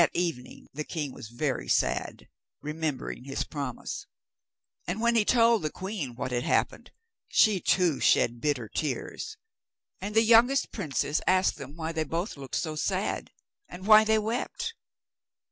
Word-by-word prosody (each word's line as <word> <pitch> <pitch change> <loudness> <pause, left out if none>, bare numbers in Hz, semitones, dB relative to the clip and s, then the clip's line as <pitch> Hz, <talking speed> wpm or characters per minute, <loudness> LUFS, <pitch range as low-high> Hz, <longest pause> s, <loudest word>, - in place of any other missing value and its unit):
That 170 - +2
evening 165 -8 -3
the 150 +2 -3
king 150 -3 -4
was - - -9
very 130 +4 -2
sad, - - 0 0.3
remembering 150 -4 -4
his 135 0 -2
promise; 140 -5 -5 0.8
and 180 +5 -2
when 235 +1 +3
he 225 - +5
told 230 0 +4
the 155 - -1
queen 185 - -5
what 125 +1 -4
had 120 0 0
happened, - - 0 0.4
she 215 -4 +4
too 175 -5 +2
shed 120 0 +3
bitter 140 -7 0
tears. 145 +4 -4 0.6
And 205 +2 -5
the 225 - +6
youngest 235 +4 +5
princess 150 -5 -1
asked 185 +1 +3
them 140 +2 -9
why 165 -1 -3
they 160 -1 -1
both 170 +7 -3
looked 135 -3 -7
so 155 -2 -2
sad, 190 +5 -1 0.4
and 185 +2 -9
why 215 0 +8
they 220 0 +3
wept. 245 - -2
165 Hz, 155 wpm, -28 LUFS, 140-215 Hz, 0.8 s, why